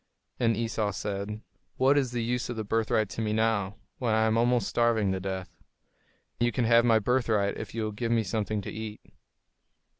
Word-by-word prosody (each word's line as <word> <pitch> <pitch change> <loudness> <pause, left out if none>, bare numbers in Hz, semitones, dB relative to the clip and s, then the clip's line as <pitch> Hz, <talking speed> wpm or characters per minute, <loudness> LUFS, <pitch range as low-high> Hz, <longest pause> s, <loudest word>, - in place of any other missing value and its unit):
And 115 -3 +2
Esau 115 -2 -1
said, 100 +1 -4 0.4
"What 135 +2 +4
is 135 -4 +1
the 120 -1 -2
use 120 +1 -1
of 120 - -3
the 110 - -3
birthright 110 0 +1
to - - -4
me 105 -1 0
now, 110 -3 +1 0.2
when 115 -4 +1
I 110 - +3
am 110 0 +2
almost 120 -2 +2
starving 115 -4 +2
to 95 - -1
death? 95 -1 -5 0.8
You 120 0 +2
can 120 0 0
have 115 +1 +5
my 115 -2 +5
birthright 110 -3 +1
if - - -7
you 115 - -1
will 110 - -2
give 115 +3 -3
me 115 -1 +3
something 105 +1 -2
to - - -6
eat." 110 0 -6
110 Hz, 200 wpm, -28 LUFS, 105-120 Hz, 0.8 s, have